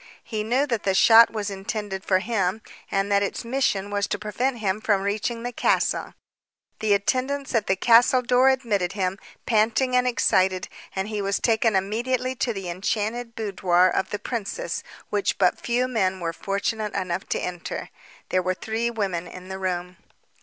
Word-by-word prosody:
He 215 -2 -3
knew 250 +6 +1
that 235 -7 -1
the 195 -1 0
shot 230 +3 +8
was 210 -2 -4
intended 195 0 -4
for 190 - +3
him, 205 0 -1 0.3
and 195 +1 0
that 200 0 +4
its 200 +3 -3
mission 230 -6 0
was 205 -1 0
to - - -2
prevent 240 +5 -2
him 210 -1 -1
from 200 -3 +1
reaching 215 +3 -2
the 245 - -3
castle. - - 0 0.6
The 210 -2 +3
attendants 265 +7 -1
at 225 -3 +1
the 190 - +3
castle 245 +4 +5
door 250 +2 +4
admitted 215 -9 0
him, 190 -1 -2 0.3
panting 230 +3 +2
and 250 0 +3
excited, 190 -5 +2 0.3
and 190 +1 -1
he 215 -1 -3
was 200 0 0
taken 225 -2 +2
immediately 240 +6 0
to 240 - 0
the 195 -4 -5
enchanted 220 +6 -2
boudoir 185 -4 +2
of 190 - 0
the 210 - -2
princess 240 - -4 0.3
which 205 -1 0
but 180 -2 +2
few 245 +1 0
men 190 -6 0
were 165 -1 -3
fortunate 210 +3 -2
enough 185 -1 -3
to - - 0
enter. 175 -1 -5 0.4
There 185 - +2
were 185 0 -1
three 225 +4 -2
women 195 -7 -2
in 185 0 -10
the 190 0 -5
room. 180 -1 -3
210 Hz, 175 wpm, -24 LUFS, 190-235 Hz, 0.6 s, shot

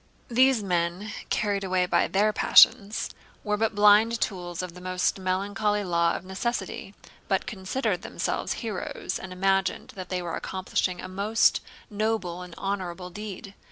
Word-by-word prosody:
These 255 -1 +4
men, 180 +2 -1 0.2
carried 200 -2 0
away 185 -1 +1
by - - +2
their 210 +2 +2
passions, 210 -1 +5 0.3
were 210 0 0
but 220 0 0
blind 210 +3 +5
tools 175 -2 -3
of 180 -2 -6
the 180 - -12
most 185 +1 0
melancholy 200 +3 0
law 170 -2 +2
of - - -6
necessity, 195 0 -4 0.3
but 195 - +1
considered 195 -1 -2
themselves - - -2
heroes 210 -5 -4
and 190 - -8
imagined 195 +1 0
that 185 -2 -8
they 180 -1 -2
were 170 -1 -3
accomplishing 185 -1 -2
a - - -6
most 200 +4 +2 0.3
noble 205 -4 -1
and 180 -2 -9
honorable 185 -2 -4
deed. 200 0 -7
195 Hz, 150 wpm, -26 LUFS, 180-210 Hz, 0.3 s, passions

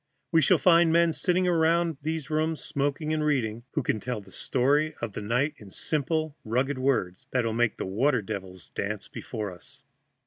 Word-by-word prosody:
We 165 -1 +5
shall 135 - +5
find 170 -2 +5
men 170 0 +4
sitting 180 +2 +1
about 165 -2 +2
these 155 0 -3
rooms, 155 +1 0
smoking 145 +1 -1
and 155 -1 0
reading, 120 -6 0
who 150 - 0
can 110 - 0
tell 125 0 -3
the 95 -2 -15
story 145 +8 +1
of 115 -3 -4
that - - -5
night 125 +8 +1
in 105 - -13
simple, 155 - -1
rugged 130 +4 0
words 120 -9 0
that 125 -2 0
will 115 - 0
make 120 -1 +1
the - - -3
water 115 +5 +1
devils 95 -5 -7
dance 100 0 -4
before 105 -5 -5
us. 130 +9 -15
135 Hz, 185 wpm, -27 LUFS, 110-155 Hz, -, We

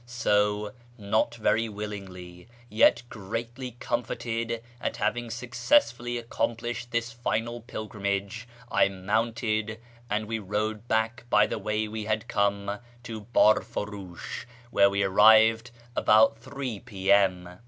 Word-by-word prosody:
So, 105 -3 +1 0.2
not 110 +2 0
very 115 0 +1
willingly, 95 -3 -8 0.2
yet 115 +2 +4
greatly 115 +4 -6
com 120 +1 -1
forted 115 0 -3 0.2
at - - -2
having 120 +3 -1
successfully 120 - +1
accomplished 120 0 -3
this 120 0 -1
final 120 0 -2
pilgrimage, 105 0 -4 0.2
I - - +4
mounted, 110 +2 -1 0.3
and 105 +1 -1
we 110 +1 -3
rode 105 +2 -3
back 110 +2 0
by 105 -1 +5
the - - -4
way 105 0 -1
we 110 0 -5
had 110 +2 -1
come 100 0 0 0.2
to 110 -4 -7
Biirt'uriish, 105 -5 0 0.3
where 100 -2 +5
we 100 0 0
arrived 110 +4 +6 0.3
about 110 +1 +5
3 130 -3 -5
p.m. 95 -4 +1
110 Hz, 120 wpm, -27 LUFS, 105-115 Hz, 0.3 s, arrived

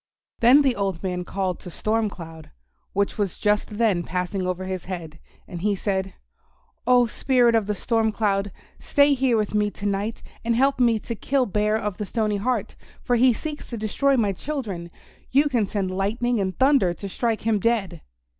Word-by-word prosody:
Then 255 +5 +6
the 265 -3 +2
old 195 -3 -2
man 180 -1 -2
called 185 -1 -2
to 180 - -9
Storm 215 +4 0
Cloud, 165 -4 -10 0.4
which 200 +2 -1
was 200 -4 -1
just 210 0 0
then 215 -6 +2
passing 180 +2 -2
over 185 0 -2
his 185 -2 -4
head, 165 -4 -7 0.3
and 175 -3 -7
he 205 +1 +1
said, 190 -1 -2 0.7
"Oh, 250 -1 +6
Spirit 240 +1 +2
of 220 -3 +2
the 210 - -1
Storm 225 +2 +1
Cloud, 200 -2 0 0.3
stay 285 0 +3
here 255 -3 +2
with 210 -1 -1
me 210 0 +2
to 205 - -9
night 205 +3 -2 0.2
and 230 0 +1
help 270 +2 +2
me 235 -2 +4
to 230 - -5
kill 265 +4 0
Bear 210 0 +1
of 210 -4 -4
the 210 - -3
Stony 215 -1 0
Heart, 225 0 -2 0.3
for 245 - +1
he 250 +2 +5
seeks 300 +6 -5
to 235 - -6
destroy 265 +6 +1
my 210 -4 +2
children. 200 - -5 0.4
You 285 +3 +4
can 235 -7 +1
send 195 -2 -2
lightning 220 +5 0
and 190 -2 -2
thunder 260 -10 +3
to 200 - -7
strike 225 +3 -1
him 220 -1 +1
dead." 225 -3 0
210 Hz, 190 wpm, -24 LUFS, 190-235 Hz, 0.7 s, Then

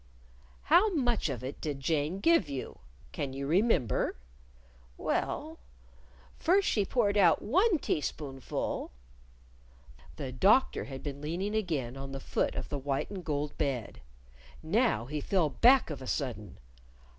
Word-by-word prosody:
"How 425 +4 +5
much 240 - +1
of 125 -3 -4
it 130 +2 -6
did 145 -3 -3
Jane 155 +5 -1
give 330 - +4
you? 135 -2 -6 0.3
Can 135 - -4
you 140 +1 -4
remember?" 175 - +2 0.8
"Well, - - -2 0.8
first 385 +4 +3
she 205 -3 +2
poured 210 -2 +1
out 175 -5 +4
one 370 - +3
teaspoonful 140 - -3 0.6
" - - -23
The 130 - -4
Doctor 200 - +3
had 135 -1 -8
been 140 -1 -5
leaning 175 +7 -3
again 155 - -2
on 135 0 -7
the 135 - -4
foot - - -1
of - - -5
the 145 - -3
white 135 +5 -2
and 190 -3 -6
gold 145 -2 -2
bed. 130 -6 -2 0.6
Now 200 - +1
he 150 +3 -4
fell 180 -3 +1
back 245 - +5
of 140 - -6
a 130 - -7
sudden. 115 - -3
150 Hz, 145 wpm, -30 LUFS, 135-205 Hz, 0.8 s, How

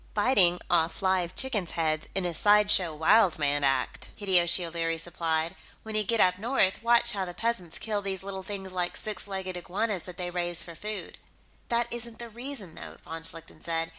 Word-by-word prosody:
"Biting 200 -6 +5
off 170 +2 +1
live 185 -1 +1
chickens' 215 -12 -2
heads, 155 -1 0
in 190 -2 0
a 175 - -1
sideshow 205 -2 +4
wild 170 +4 +4
man 145 -1 +1
act," 135 -2 0
Hideyoshi 180 -3 +3
O'Leary 165 0 -1
supplied. 165 -1 -1 0.3
"When 220 - -7
you 215 0 +1
get 230 +2 0
up 180 -1 +4
north, 220 -4 +1
watch 235 +1 +5
how 200 -3 -2
the 175 -1 -6
peasants 205 -8 -2
kill 210 -2 -2
these 195 -1 -3
little 195 -1 -5
things 190 0 -6
like 180 -1 -2
six 215 -1 -4
legged 190 -2 -4
iguanas 190 +2 -2
that 180 -1 -9
they 175 -1 -4
raise 175 -1 -2
for 170 - -9
food." 210 +6 -6 0.5
"That 235 0 +2
isn't 235 -1 -1
the 235 -1 -7
reason, 235 - -5
though," - - -9
von 165 0 -7
Schlichten 165 0 -5
said. 165 -1 -1
185 Hz, 190 wpm, -28 LUFS, 170-210 Hz, 0.5 s, Biting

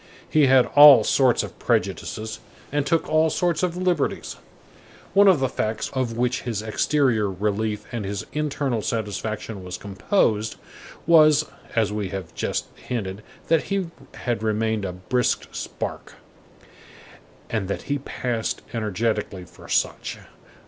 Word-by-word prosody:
He 150 -3 +4
had 130 -1 +6
all 145 -5 +10
sorts 130 +2 +3
of - - -9
prejudices 110 0 -2 0.3
and 145 0 0
took 165 -1 +1
all 155 +1 +3
sorts 170 0 0
of 180 -1 -1
liberties. 180 -1 -1 0.8
One 200 +1 +6
of 185 -6 +6
the 130 - +1
facts 110 -2 -3
of 125 -4 -2
which 125 +1 0
his 115 -4 -3
exterior 110 -1 +1
relief 105 +2 -2
and 115 -3 -3
his 100 +2 -4
internal 140 -5 -1
satisfaction 110 -2 -4
was 90 0 -6
composed, 105 - 0 0.5
was, 155 -2 +6 0.3
as 110 -3 +1
we 105 -3 -2
have 95 -3 -6
just - - -2
hinted, 100 -4 -5 0.3
that 165 -1 +2
he 195 -4 -2 0.2
had 120 -3 -2
remained 110 -1 0
a 90 - -4
brisk 120 +8 -1
spark, - - -6 1.4
and 110 -4 -1
that 100 - -3
he 145 0 -2
passed 120 -4 -3
energetically 110 -3 -2
for - - -15
such. - - -1
115 Hz, 135 wpm, -24 LUFS, 105-145 Hz, 1.4 s, all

